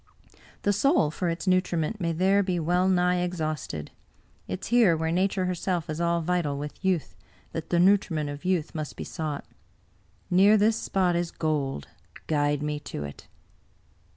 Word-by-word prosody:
The 205 Hz, -, +3 dB
soil 205 Hz, -, +3 dB
for 175 Hz, +2 st, -2 dB
its 165 Hz, +3 st, -3 dB
nutriment 185 Hz, +1 st, +1 dB
may 170 Hz, -1 st, 0 dB
there 190 Hz, +4 st, +3 dB
be 185 Hz, -3 st, -1 dB
well 180 Hz, +3 st, +2 dB
nigh 180 Hz, -1 st, +3 dB
exhausted. 155 Hz, -, -3 dB, 0.6 s
It 95 Hz, -, -4 dB
is -, -, -5 dB
here, 225 Hz, -9 st, +5 dB
where 160 Hz, 0 st, -1 dB
Nature 185 Hz, +1 st, +1 dB
herself 180 Hz, -2 st, -2 dB
is 155 Hz, +2 st, -3 dB
all 170 Hz, 0 st, +1 dB
vital 165 Hz, -4 st, 0 dB
with 150 Hz, +6 st, -7 dB
youth, 185 Hz, -5 st, 0 dB, 0.4 s
that 165 Hz, -1 st, -5 dB
the 175 Hz, -, +2 dB
nutriment 180 Hz, -5 st, +3 dB
of 145 Hz, +2 st, -7 dB
youth 180 Hz, -4 st, 0 dB
must 155 Hz, -3 st, -5 dB
be -, -, -6 dB
sought. 155 Hz, -3 st, -4 dB, 0.9 s
Near 200 Hz, +4 st, +6 dB
this 215 Hz, +2 st, +3 dB
spot 185 Hz, -5 st, +1 dB
is 175 Hz, 0 st, 0 dB
gold; 145 Hz, -, -2 dB, 0.4 s
guide 145 Hz, -1 st, +1 dB
me 150 Hz, 0 st, -2 dB
to 110 Hz, -, -6 dB
it." 70 Hz, -1 st, -9 dB
170 Hz, 165 wpm, -27 LUFS, 155-185 Hz, 0.9 s, Near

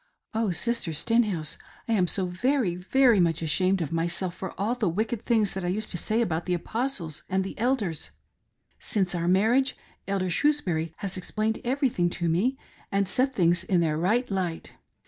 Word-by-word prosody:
Oh, 220 Hz, -1 st, 0 dB
Sister 185 Hz, -1 st, 0 dB
Stenhouse, 200 Hz, -3 st, 0 dB, 0.3 s
I 230 Hz, -, +1 dB
am 185 Hz, -4 st, +3 dB
so 190 Hz, +2 st, +2 dB
very, 200 Hz, +3 st, 0 dB
very 235 Hz, +5 st, +3 dB
much 165 Hz, -2 st, +2 dB
ashamed 185 Hz, +3 st, +2 dB
of 150 Hz, -, -5 dB
myself 170 Hz, +2 st, -1 dB
for 190 Hz, 0 st, -7 dB
all 210 Hz, +4 st, +1 dB
the 225 Hz, -7 st, 0 dB
wicked 220 Hz, +5 st, -2 dB
things 220 Hz, -5 st, +2 dB
that 190 Hz, -, -4 dB
I -, -, -1 dB
used 210 Hz, +4 st, -2 dB
to 175 Hz, -, -2 dB
say 225 Hz, +7 st, +1 dB
about 170 Hz, -4 st, -2 dB
the 180 Hz, -, +2 dB
Apostles 195 Hz, -, -3 dB
and 190 Hz, +1 st, +1 dB
the 195 Hz, -, -6 dB
Elders. 220 Hz, -, 0 dB, 0.7 s
Since 190 Hz, -5 st, 0 dB
our 170 Hz, -1 st, -1 dB
mar 195 Hz, +5 st, +4 dB
riage, 265 Hz, +1 st, +2 dB, 0.3 s
Elder 190 Hz, -2 st, -1 dB
Shrewsbury 170 Hz, -, +1 dB
has 195 Hz, -2 st, -3 dB
explained 215 Hz, +4 st, -2 dB
everything 245 Hz, -9 st, +1 dB
to 170 Hz, -, -1 dB
me 205 Hz, +12 st, +1 dB, 0.3 s
and 200 Hz, 0 st, +1 dB
set 260 Hz, +6 st, +1 dB
things 175 Hz, -2 st, +3 dB
in 185 Hz, -1 st, +2 dB
their 160 Hz, -2 st, +1 dB
right 215 Hz, +10 st, +1 dB
light. 180 Hz, -4 st, -2 dB
190 Hz, 185 wpm, -27 LUFS, 175-230 Hz, 0.7 s, mar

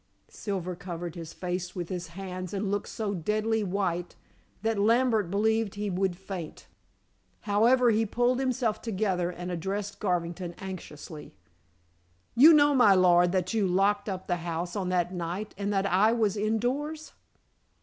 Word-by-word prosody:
Silver 185 Hz, -3 st, -4 dB
covered 175 Hz, -2 st, -6 dB
his 165 Hz, -2 st, -8 dB
face 180 Hz, 0 st, -4 dB
with 175 Hz, -2 st, -4 dB
his 180 Hz, -2 st, -4 dB
hands 185 Hz, -1 st, -5 dB
and 195 Hz, 0 st, -1 dB
looked 205 Hz, 0 st, -2 dB
so 210 Hz, -2 st, -3 dB
deadly 215 Hz, +5 st, 0 dB
white 180 Hz, -3 st, -2 dB, 0.5 s
that 225 Hz, -2 st, 0 dB
Lambert 225 Hz, -2 st, +3 dB
believed 220 Hz, +1 st, +1 dB
he 205 Hz, -1 st, -2 dB
would 185 Hz, 0 st, 0 dB
faint. 190 Hz, -4 st, -7 dB, 0.8 s
However, 235 Hz, +4 st, +4 dB
he 220 Hz, 0 st, +1 dB
pulled 245 Hz, +4 st, +1 dB
himself 250 Hz, -4 st, 0 dB
together, 190 Hz, -5 st, -1 dB
and 180 Hz, 0 st, -6 dB
addressed 200 Hz, +4 st, -4 dB
Garvington 175 Hz, -2 st, -2 dB
anxiously. 165 Hz, -5 st, -9 dB, 1.0 s
"You 285 Hz, +7 st, +9 dB
know, 290 Hz, -2 st, +6 dB
my 230 Hz, -7 st, +6 dB
lord, 175 Hz, -1 st, +5 dB
that 185 Hz, +1 st, 0 dB
you 215 Hz, -4 st, +2 dB
locked 200 Hz, +3 st, +1 dB
up 190 Hz, -1 st, -4 dB
the 175 Hz, -, 0 dB
house 170 Hz, +1 st, -4 dB
on 190 Hz, -3 st, -2 dB
that 180 Hz, 0 st, 0 dB
night, 180 Hz, +4 st, -4 dB
and 200 Hz, +1 st, -2 dB
that 195 Hz, -1 st, +1 dB
I 200 Hz, +4 st, +4 dB
was 220 Hz, -4 st, +1 dB
indoors." 250 Hz, +9 st, -2 dB
195 Hz, 150 wpm, -28 LUFS, 180-220 Hz, 1.0 s, You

